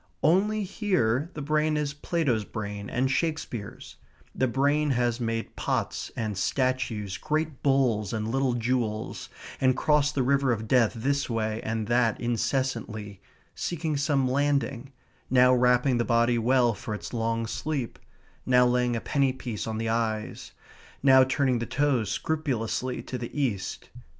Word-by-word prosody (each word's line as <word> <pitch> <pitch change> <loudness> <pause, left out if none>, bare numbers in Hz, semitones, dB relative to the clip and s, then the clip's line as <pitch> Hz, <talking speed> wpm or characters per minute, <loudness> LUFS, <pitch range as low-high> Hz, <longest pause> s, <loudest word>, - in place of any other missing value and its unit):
Only 205 +7 +3
here 175 - 0
the 150 - -4
brain 155 +1 +1
is 150 -1 -1
Plato's 145 -7 0
brain 105 -1 -6
and 130 +2 0
Shakespeare's; 155 -9 -3 0.4
the 130 - +1
brain 145 +4 +1
has 120 -2 +1
made 115 -1 -3
pots - - -2
and 110 -3 -2
statues, 115 -3 -1
great 155 -2 -2
bulls 125 -8 +2
and 110 -1 -2
little 130 +2 +1
jewels, 115 -2 -2 0.3
and 130 -1 +3
crossed 150 -1 +2
the 135 - +2
river 140 0 +2
of 110 -1 -2
death 120 -3 +3
this 140 +5 -1
way 110 -1 -1
and 110 0 -2
that 120 -1 +2
incessantly, 120 -4 -2 0.3
seeking 160 -3 -2
some 140 -2 +1
landing, 140 -1 0 0.4
now 125 0 +5
wrapping 125 0 +3
the - - +2
body 120 0 +2
well 120 0 +3
for 105 +1 -5
its 105 - -8
long 115 0 -1
sleep; 135 +1 -3 0.4
now 125 -1 +4
laying 125 -1 +1
a 115 - -2
penny 140 -2 +1
piece 120 -5 -5
on 110 -1 -3
the 115 0 -2
eyes; 110 -2 -2 0.5
now 130 -1 +7
turning 130 -1 +1
the 120 - -3
toes 140 -7 +1
scrupulously 130 -4 -2
to 125 - -5
the 120 +5 -5
East. 115 -9 -2
125 Hz, 150 wpm, -27 LUFS, 115-140 Hz, 0.5 s, now